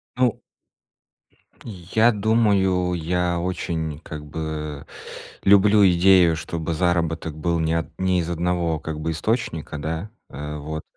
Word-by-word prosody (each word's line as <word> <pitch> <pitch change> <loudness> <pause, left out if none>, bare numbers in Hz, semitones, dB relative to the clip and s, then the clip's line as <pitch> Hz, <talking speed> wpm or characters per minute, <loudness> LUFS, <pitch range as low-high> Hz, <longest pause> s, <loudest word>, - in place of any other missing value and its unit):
Ну 125 -3 +1 1.3
Я 110 +3 +1
думаю, 100 -5 +2
я 90 +1 -1
очень 80 -4 -3
как 80 -2 -8
бы, 75 -1 -5 0.6
люблю 100 +1 +5
идею, 90 -1 +5
чтобы 80 0 -4
заработок 85 -2 0
был 85 +2 -1
не 80 0 0
от 80 -1 -1
не 95 -1 +2
из 85 0 -2
одного, 85 -1 -1
как 80 0 -5
бы, 80 +1 -2
источника, 85 -3 -2
да, 80 +7 -4 0.2
э, 75 +2 -6
вот. 75 +1 -5
85 Hz, 125 wpm, -23 LUFS, 80-95 Hz, 1.3 s, люблю